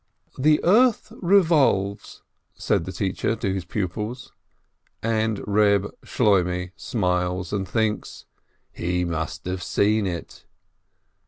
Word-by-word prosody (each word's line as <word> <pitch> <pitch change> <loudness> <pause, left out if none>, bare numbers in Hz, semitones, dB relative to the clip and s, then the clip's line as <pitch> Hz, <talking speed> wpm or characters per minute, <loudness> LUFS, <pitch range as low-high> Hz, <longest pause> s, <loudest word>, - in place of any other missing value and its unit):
"The 150 +3 +4
earth 230 +6 +3
revolves," 160 - +2 0.3
said 80 - 0
the 95 - -5
teacher 95 +4 -1
to 100 -4 -2
his 95 -3 -4
pupils, 105 +8 -4 0.7
and 110 -2 0
Reb 100 -1 +2
Shloimeh 90 -5 +1
smiles, 90 -4 -1
and 95 -2 -2
thinks, 110 +1 -2 0.5
"He 90 +1 -1
must 80 -2 -4
have 90 0 -3
seen 105 +2 +1
it 85 -2 -7
100 Hz, 105 wpm, -24 LUFS, 90-115 Hz, 0.7 s, The